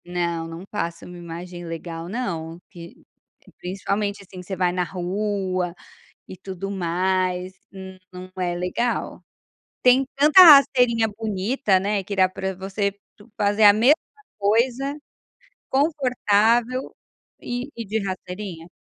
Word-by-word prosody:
Não, 170 -2 -2
não 165 +3 -9
passa 170 -5 -5
uma 180 0 -10
imagem 175 +1 -8
legal, 165 0 -7
não, 170 -8 -4
p 170 -2 -11 0.6
principalmente 200 +2 -3
assim 185 -1 -12
que - - -8
você 190 - -4
vai 180 -1 +1
na 180 0 -1
rua 185 0 -2 0.5
e 185 - -10
tudo 190 +1 -7
mais, 185 0 -1 0.2
n 190 -1 -10
não 185 0 -10
é 175 -1 -1
legal. 180 +7 -2 0.6
Tem 255 +2 +5
tanta 300 +6 +7
rasteirinha 250 -8 +7
bonita, 210 -1 0
né, 200 +1 -1
que 200 - -5
dá 185 -1 +4
para 190 +1 -4
você 195 +2 -3 0.4
fazer 205 +1 +2
a 205 - +10
mesma 240 +9 +5 0.4
coisa, 240 +7 +1 0.7
confortável 255 -4 +1 0.5
e 245 +2 -4
ir 230 - -5
de 215 +3 -1
rasteirinha. 185 -2 -7
195 Hz, 125 wpm, -23 LUFS, 180-225 Hz, 0.7 s, a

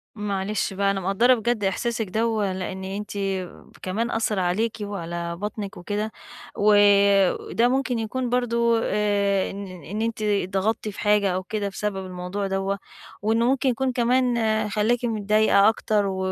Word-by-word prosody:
معلش 205 -1 -2
بقى، 195 +1 +1
أنا 195 - -2
مقدرة 195 +7 +4
بجد 235 -2 -1
إحساسكِ 225 +4 -1
دَوَّة، 215 -2 0
لإن 190 0 -5
أنتِ 200 +2 -5 0.7
كمان 225 +6 -2
أثّر 220 -3 0
عليكِ 205 +6 0
وعلى 170 -4 -4
بطنِك 205 +1 -5
وكده، 210 +4 -3 0.5
وده 205 +1 +4
ممكن 255 -2 0
يكون 245 +3 -2
برضه 235 -1 +2
آآ 200 -2 +1
إن 200 0 -7
إن 180 -4 -11
إن 210 +8 -4
أنتِ 225 -1 -2
اتضغطتِ 205 +1 0
في 200 - -9
حاجة 210 -1 +3
أو 185 - -2
كده 200 +1 -3
بسبب 195 -1 -3
الموضوع 185 +2 -4
دَوَّة، 195 +1 -1 0.4
وإنه 225 +3 +2
ممكن 265 +1 +2
يكون 255 +2 0
كمان 245 0 +2 0.3
خلّاكِ 230 +4 +1
متضايقة 215 -1 +3
أكتر 210 -2 0
و 190 -1 -2
210 Hz, 145 wpm, -24 LUFS, 195-225 Hz, 0.7 s, مقدرة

